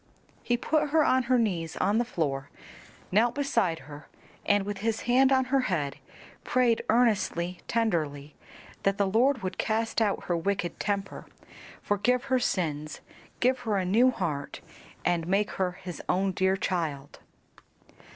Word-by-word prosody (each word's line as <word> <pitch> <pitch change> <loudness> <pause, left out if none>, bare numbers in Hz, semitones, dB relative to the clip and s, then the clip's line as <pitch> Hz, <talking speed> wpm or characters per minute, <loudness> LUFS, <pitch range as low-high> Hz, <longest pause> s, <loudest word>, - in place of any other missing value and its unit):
He 240 - 0
put 300 +4 0
her 310 +1 +4
on 255 -1 +3
her 255 - +5
knees 175 -8 -1
on 205 +4 +2
the 240 - +1
floor, 140 - -2 0.6
knelt 230 +5 +3
beside 230 - 0
her, 150 +1 -11 0.4
and 205 -1 +3
with 205 -1 -4
his 225 +1 -1
hand 260 +3 +4
on 260 -1 +3
her 275 - +5
head 145 -6 -1 0.5
prayed 245 -3 +2
earnestly, 205 -7 +1
tenderly 155 -11 -1 0.5
that 195 0 +1
the 200 - +2
Lord 235 +5 +2
would 185 0 -4
cast 225 +1 0
out 205 -3 +1
her 175 - -1
wicked 175 0 -2
temper, 200 -1 -3 0.6
forgive 240 +5 +1
her 260 -1 +1
sins, 155 -9 -2 0.4
give 255 +1 +3
her 215 -3 -1
a 185 - 0
new 230 +8 +4
heart, 160 - -3 0.4
and 170 -2 +1
make 200 +3 +1
her 185 -2 -1
his 180 -2 -8
own 190 +1 +2
dear 190 +1 +1
child. 155 -8 -3
200 Hz, 150 wpm, -28 LUFS, 175-240 Hz, 0.6 s, her